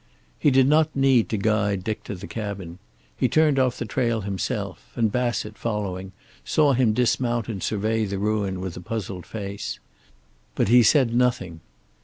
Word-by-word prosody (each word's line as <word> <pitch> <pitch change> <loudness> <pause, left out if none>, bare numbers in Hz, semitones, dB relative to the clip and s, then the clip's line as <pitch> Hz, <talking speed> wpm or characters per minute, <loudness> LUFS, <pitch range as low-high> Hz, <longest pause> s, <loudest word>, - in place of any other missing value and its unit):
He - - +4
did 135 -1 +4
not 155 +1 +3
need 135 -4 +3
to 110 - -1
guide 100 -2 +1
Dick 110 +1 -3
to 105 - -5
the 95 +2 -8
cabin. 100 -5 -6 0.4
He 130 - +1
turned 150 0 +3
off 130 -2 +1
the - - -3
trail 115 0 0
himself, 95 -3 -4
and 115 -3 +1
Bassett, 120 -3 -2
following, 95 -4 -3 0.3
saw 145 - +3
him 120 -4 +3
dismount 120 -1 +1
and 105 -5 -5
survey 110 +1 0
the 100 -1 -3
ruin 100 -2 -1
with 95 -3 -5
a - - -7
puzzled 95 -2 -5
face. 100 -2 -5 0.8
But - - +1
he 125 +1 +7
said 125 0 +4
nothing. 115 -9 0
110 Hz, 170 wpm, -24 LUFS, 100-125 Hz, 0.8 s, he